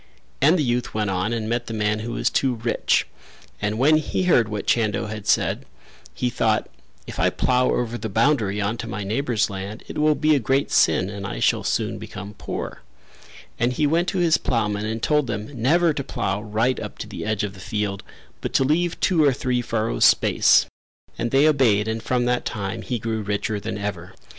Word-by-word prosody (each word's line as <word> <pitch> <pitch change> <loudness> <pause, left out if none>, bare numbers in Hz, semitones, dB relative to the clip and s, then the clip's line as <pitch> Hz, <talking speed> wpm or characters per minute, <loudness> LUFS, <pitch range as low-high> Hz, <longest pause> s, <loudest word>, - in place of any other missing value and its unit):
And 155 +6 +5
the 155 - +1
youth 120 -3 -1
went 105 -2 0
on 95 +4 -1
and 115 -2 -2
met 120 +1 -2
the 115 - -4
man 105 0 0
who 115 +2 -5
was - - 0
too 130 -2 +1
rich, 115 +1 +1 0.6
and 105 +1 -1
when 150 +5 +5
he 155 +4 -1
heard 120 -11 +3
what 105 -2 -4
Chando 110 -2 +1
had 105 -1 -7
said - - +1 0.5
he 125 - -1
thought 110 -2 +1 0.4
"If - - -8
I - - +4
plough 125 0 +1
over 120 0 -1
the 110 - -4
boundary 110 -2 +1
on 105 +3 -1
to - - -6
my 100 +1 -4
neighbour's 115 +1 0
land 100 +3 -6
it - - -5
will 150 0 +4
be 155 +2 +3
a 145 - +3
great 135 +4 0
sin 80 +3 +3
and 100 -1 -6
I - - -5
shall - - +2
soon - - -1
become 100 +1 -8
poor;" - - -5 0.8
and 120 +1 +1
he 150 - +1
went 165 +4 +2
to 195 - -1
his 170 -3 +3
ploughmen 105 -3 -1
and 110 +1 -4
told 150 -3 +2
them 105 +3 -4
never 165 +6 +3
to 140 - -3
plough 95 -5 -2
right 110 +4 0
up - - -7
to - - -6
the - - -7
edge 110 -1 -1
of 100 -2 -3
the 95 - -13
field 100 0 -3 0.4
but - - -4
to - - +4
leave 165 +5 +1
two 165 -6 +3
of 135 -3 +3
three 125 -2 0
furrows 115 -1 -1
space, - - +5 0.5
and 120 - -1
they 135 +5 +4
obeyed 115 -8 +3
and 110 0 -2
from 120 +1 0
that 125 0 +1
time 105 +1 -4
he 125 +2 -3
grew 110 0 -3
richer 105 +1 -2
than 105 0 -5
ever. 100 -4 -5
115 Hz, 210 wpm, -23 LUFS, 105-135 Hz, 0.8 s, And